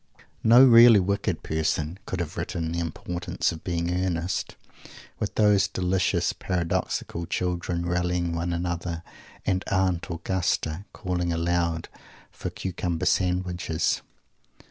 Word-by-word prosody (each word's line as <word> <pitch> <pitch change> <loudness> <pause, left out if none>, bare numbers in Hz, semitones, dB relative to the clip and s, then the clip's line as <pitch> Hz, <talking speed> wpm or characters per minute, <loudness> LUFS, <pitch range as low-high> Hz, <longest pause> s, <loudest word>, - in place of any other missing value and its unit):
_ - - -22 0.2
No 120 +4 +8
really 115 -3 +9
wicked 100 +2 -1
person 80 +2 -1
could 95 - -3
have 85 +2 -5
written 80 -6 -3
"The 85 - -2
Importance 85 +1 -2
of 80 - -8
Being 85 -1 -1
Earnest," 90 +1 -2 0.6
with 105 - -3
those 105 -2 +4
delicious, 90 -1 0
paradoxical 85 -1 -2
children 90 -1 -2
rallying 90 0 0
one 85 +1 -2
another, 85 -1 -3 0.4
and 95 0 +1
"Aunt 95 -3 +1
Augusta" 90 0 -1
calling 90 -3 -2
aloud 85 0 0 0.4
for - - -5
cucumber 90 -2 -3
sandwiches! 90 -3 0
90 Hz, 120 wpm, -26 LUFS, 85-95 Hz, 0.6 s, really